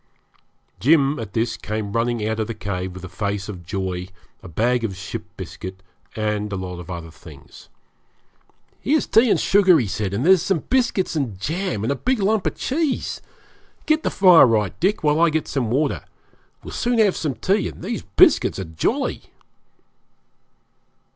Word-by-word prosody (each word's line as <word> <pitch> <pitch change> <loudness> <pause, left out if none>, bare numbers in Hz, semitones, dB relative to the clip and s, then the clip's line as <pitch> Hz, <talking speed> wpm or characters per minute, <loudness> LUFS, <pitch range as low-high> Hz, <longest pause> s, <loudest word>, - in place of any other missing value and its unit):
Jim 145 +1 +3
at 105 -4 -7
this 115 +1 0
came 105 -1 -4
running 115 -2 0
out 110 0 -2
of 110 - -1
the 115 - -5
cave 95 -3 -4
with 95 0 -10
a - - -6
face 100 +1 -3
of 95 -4 -8
joy, 90 0 -4 0.3
a - - -11
bag 120 +8 0
of 100 -4 -2
ship 105 +4 -6
biscuit, 95 +1 -8 0.3
and 105 -1 -2
a - - -2
lot 90 -2 -5
of 90 +1 -10
other 85 -2 -6
things. 80 -4 -15 1.1
'Here's 300 +3 +1
tea 230 +2 +4
and - - +3
sugar,' 195 -3 +5
he 125 - +1
said; 100 0 -3
'and 110 +8 -1
there's 190 0 +4 0.2
biscuits 240 -9 +1
and 120 -11 -2
jam, 165 - -2
and 115 - 0
a - - 0
big 255 - 0
lump 210 0 +1
of - - -3
cheese. 295 0 -2 0.6
Get 310 0 +2
the - - 0
fire 180 -7 +7
right, 105 -6 +1
Dick, 195 0 +1
while 150 +1 +3
I 170 0 +5
get 155 0 -1
some 125 -5 -1
water. 140 +5 0 0.6
We'll - - -8
soon 245 -1 0
have 210 -4 +4
some 150 -5 -2
tea, 195 - +1
and - - -12
these 225 +4 -3
biscuits 360 -5 +4
are 95 - -3
jolly.' 80 -2 -2
115 Hz, 175 wpm, -22 LUFS, -, 1.1 s, fire